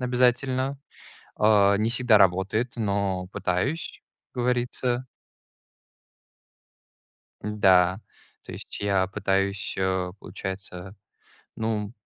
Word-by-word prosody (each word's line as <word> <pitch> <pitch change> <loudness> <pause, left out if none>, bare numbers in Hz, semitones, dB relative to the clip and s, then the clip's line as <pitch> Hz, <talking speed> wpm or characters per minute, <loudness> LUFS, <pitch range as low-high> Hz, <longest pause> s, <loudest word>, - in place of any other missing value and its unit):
обязательно. 130 +2 +1 0.6
А, 100 -2 +5
не 110 +2 +1
всегда 125 -3 +4
работает, 95 +5 +2
но 100 -4 -1
пытаюсь, 100 - -2 0.3
говорится 125 0 -1 2.4
Н-да, 95 -2 +3 0.4
то - - -9
есть, - - -8
я 100 -2 +2
пытаюсь, 100 +1 -1
э, 95 -1 0
получается, 95 0 -7 0.6
ну, 110 -1 -2
100 Hz, 80 wpm, -26 LUFS, 95-120 Hz, 2.4 s, А